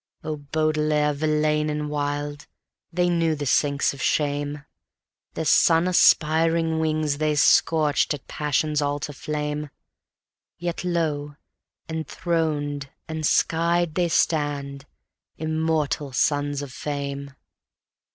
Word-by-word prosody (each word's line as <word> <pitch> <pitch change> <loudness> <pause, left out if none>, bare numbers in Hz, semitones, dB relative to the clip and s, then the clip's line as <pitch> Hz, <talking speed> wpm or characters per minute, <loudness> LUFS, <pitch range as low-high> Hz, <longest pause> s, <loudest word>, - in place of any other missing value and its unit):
Oh 155 -1 -3
Baudelaire, 150 0 0
Verlaine 150 0 +1
and 150 0 -2
Wilde, 145 0 -3 0.4
they 180 +1 +1
knew 165 -2 +1
the 145 -1 -4
sinks 140 +1 +2
of 135 - -9
shame; 145 +2 -1 0.7
Their 160 - -2
sun 165 +3 +4
aspiring 165 -1 +3
wings 155 -2 0
they 155 -1 +1
scorched 150 +1 +3
at 140 - -14
passion's 150 0 0
altar 145 +1 -2
flame; 150 +1 -3 0.9
Yet 175 0 -4
lo! 155 -5 -1 0.5
enthroned, 160 -3 -2 0.2
enskied 165 +1 +1
they 175 0 +1
stand, 145 -3 0 0.5
Immortal 155 -3 -1
Sons 145 +1 0
of 135 -2 -9
Fame. 140 -1 -5
150 Hz, 105 wpm, -24 LUFS, 145-160 Hz, 0.9 s, sun